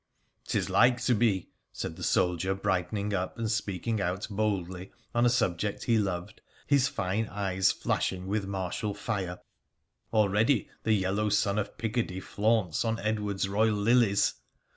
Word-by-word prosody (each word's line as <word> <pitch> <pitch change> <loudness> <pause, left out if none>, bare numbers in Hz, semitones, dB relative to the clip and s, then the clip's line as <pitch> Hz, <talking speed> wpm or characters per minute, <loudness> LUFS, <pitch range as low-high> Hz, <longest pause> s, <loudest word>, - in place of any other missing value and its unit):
' - - -45
'Tis - - 0
like 125 0 +4
to 125 - +2
be,' 105 -5 +1 0.2
said - - -5
the - - -11
soldier, 90 +2 +1
brightening 100 +2 -1
up 95 -1 -2
and 115 -2 -1
speaking 105 +1 -1
out 95 +2 -1
boldly 95 -3 -2 0.2
on 120 +1 +3
a - - +5
subject 105 -5 0
he 115 -2 +3
loved, 90 -4 -3 0.2
his 140 -3 +3
fine 100 0 -1
eyes 95 -2 +1
flash - - 0
ing 95 -1 -7
with 100 0 -1
martial 100 +2 -3
fire 100 -4 -3 0.2
— - - -51
' - - -48
already 110 +4 +3
the 110 - +2
yellow 100 +1 +1
sun 105 0 +2
of 100 - -4
Picardy 115 -5 -2
flaunts 105 -3 +1
on 115 -1 0
Edward's 105 -2 -1
royal 105 +2 +2
lilies 105 -1 +3
105 Hz, 165 wpm, -29 LUFS, 95-110 Hz, 0.2 s, a